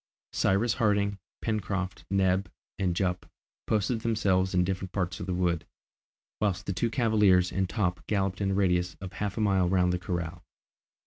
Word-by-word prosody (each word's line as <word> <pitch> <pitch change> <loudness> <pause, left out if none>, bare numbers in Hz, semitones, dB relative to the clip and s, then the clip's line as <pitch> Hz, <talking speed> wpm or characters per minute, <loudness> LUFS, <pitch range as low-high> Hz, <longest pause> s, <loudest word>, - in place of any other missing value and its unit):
Cyrus 105 +5 +2
Harding, 100 -2 +1 0.2
Pencroft, 100 -4 -2
Neb, 95 0 +2 0.3
and 90 -3 +1
Jup, 90 -2 -1 0.4
posted 110 +2 +1
themselves 95 -5 +1
in 90 - +4
different 95 0 -3
parts 90 -2 -2
of 90 - -5
the 95 - -1
wood, 85 -2 +1 0.8
whilst 100 -2 0
the 95 - -2
two 115 +6 0
cavaliers 105 -7 +3
and 95 0 -1
Top 90 -4 -1
galloped 100 -2 0
in 100 - +1
a - - +1
radius 90 -3 +1
of 95 -1 -7
half 105 0 -3
a - - 0
mile 95 -4 +3
round 90 -1 +3
the 90 - -1
corral. 85 -2 -4
95 Hz, 170 wpm, -28 LUFS, 90-100 Hz, 0.8 s, in